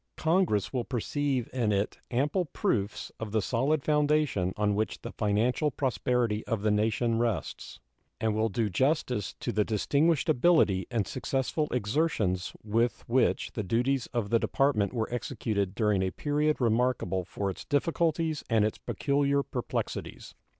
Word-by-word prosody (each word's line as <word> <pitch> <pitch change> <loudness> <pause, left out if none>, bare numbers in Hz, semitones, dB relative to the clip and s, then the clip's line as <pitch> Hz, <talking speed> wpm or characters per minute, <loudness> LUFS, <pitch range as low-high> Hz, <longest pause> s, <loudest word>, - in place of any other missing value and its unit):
Congress 160 - +1
will 125 -2 0
perceive 135 +1 -1
in 120 -5 +1
it 100 +1 -1
ample 145 +9 +1
proofs 110 - -2
of 110 -2 -5
the 110 - +2
solid 135 +8 0
foundation 150 -10 +2
on 105 -1 +2
which 110 +2 -1
the - - -5
financial 115 +8 +1
prosperity 125 -4 0
of 110 -3 -1
the 110 - +3
nation 110 +2 +1
rests, 115 -7 -3 0.4
and 110 -1 +1
will 110 +1 +1
do 110 +2 0
justice 125 - 0
to - - -2
the 105 - +2
distinguished 140 - +1
ability 150 - +3
and 115 -5 0
successful 135 - -1
exertions 105 - 0
with 115 +3 0
which 125 +1 +1
the 110 - -3
duties 120 +6 0
of 115 -4 -3
the 115 - +4
Department 135 -8 +1
were 115 -1 -2
executed 105 -6 -2
during 105 -4 +2
a 95 - +1
period 150 +7 0
remarkable 115 -6 +1
for 100 +2 -3
its - - -9
difficulties 160 +1 0
and 110 -3 +3
its 110 - -2
peculiar 140 -1 +1
perplexities. 125 -3 -4
120 Hz, 150 wpm, -29 LUFS, 105-140 Hz, 0.4 s, the